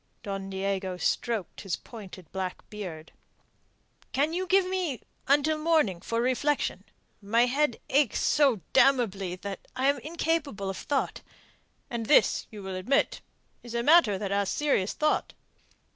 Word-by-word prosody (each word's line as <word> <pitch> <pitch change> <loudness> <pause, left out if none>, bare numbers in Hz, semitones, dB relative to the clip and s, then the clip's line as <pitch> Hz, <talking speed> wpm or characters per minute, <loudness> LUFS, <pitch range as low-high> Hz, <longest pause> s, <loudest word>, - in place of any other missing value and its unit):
Don 195 -1 -4
Diego 190 -1 -2
stroked 210 +3 -1
his 195 -4 -2
pointed 195 -6 -11
black 185 -1 -5
beard. 175 -7 -7 1.0
"Can 290 +5 +1
you 370 +2 -2
give 380 0 +4
me 360 - -2 0.2
until 295 +3 +3
morning 305 - +2
for 230 +4 -2
reflection? 260 +4 0 0.4
My 230 +4 +3
head 270 0 +1
aches 280 -4 +2
so 270 -9 +3
damnably 235 -9 +3
that 195 +1 -7
I 265 +2 +2
am 280 - +1
incapable 300 - -2
of 190 - -7
thought. 285 -2 -2 0.7
And 230 -2 -4
this, 300 - +4
you 210 -2 -9
will 190 0 -5
admit, 210 +10 +1 0.4
is 240 -1 -8
a 235 - 0
matter 295 - +6
that 195 0 -4
asks 200 -1 0
serious 275 -10 +1
thought." 305 0 0
235 Hz, 145 wpm, -28 LUFS, 195-290 Hz, 1.0 s, matter